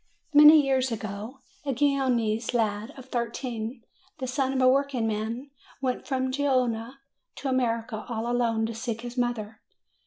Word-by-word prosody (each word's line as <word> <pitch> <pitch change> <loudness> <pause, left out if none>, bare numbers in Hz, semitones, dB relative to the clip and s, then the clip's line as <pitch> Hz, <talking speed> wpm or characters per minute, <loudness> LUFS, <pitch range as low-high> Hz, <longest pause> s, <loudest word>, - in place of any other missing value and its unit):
Many 300 +1 +9
years 260 -2 +1
ago 215 +4 -6 0.2
a 275 -2 -1
Genoese 250 -4 +1
lad 215 -1 0
of 260 - -10
thirteen, 235 -1 -4 0.3
the 265 - -4
son 260 +1 0
of 265 - -1
a 255 - +5
workingman, 250 -2 0 0.3
went 255 -2 -2
from 260 -2 0
Genoa 255 -3 0 0.4
to 275 - -4
America 230 -3 -1
all 225 -1 -2
alone 235 -2 +1
to 230 - -4
seek 230 0 -4
his 240 0 -7
mother. 230 -3 -2
245 Hz, 145 wpm, -27 LUFS, 225-265 Hz, 0.4 s, Many